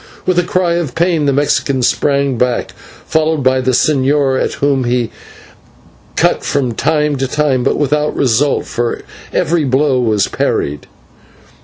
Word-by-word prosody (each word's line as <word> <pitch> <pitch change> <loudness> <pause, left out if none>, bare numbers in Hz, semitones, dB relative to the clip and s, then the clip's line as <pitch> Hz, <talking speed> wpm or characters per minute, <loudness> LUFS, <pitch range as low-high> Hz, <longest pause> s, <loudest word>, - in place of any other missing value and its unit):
With 185 -1 +2
a - - +2
cry 175 0 0
of 155 -8 -3
pain, 165 -3 +1
the - - +3
Mexican 140 -1 0
sprang 140 0 +1
back, 125 0 -1 0.3
followed 160 -2 0
by 130 0 +2
the 130 - -1
señor, 135 0 +2
at - - -2
whom 140 -2 0
he 120 -1 0 1.0
cut - - +1
from 135 -4 -1
time 150 +2 0
to 135 0 -1
time, 135 -3 0
but 135 - +1
without 150 +1 0
result, 135 +2 +1
for 120 0 -3 0.3
every 165 0 +1
blow 135 0 +1
was 110 -5 +1
parried. 75 0 -2
140 Hz, 150 wpm, -15 LUFS, 130-150 Hz, 1.0 s, the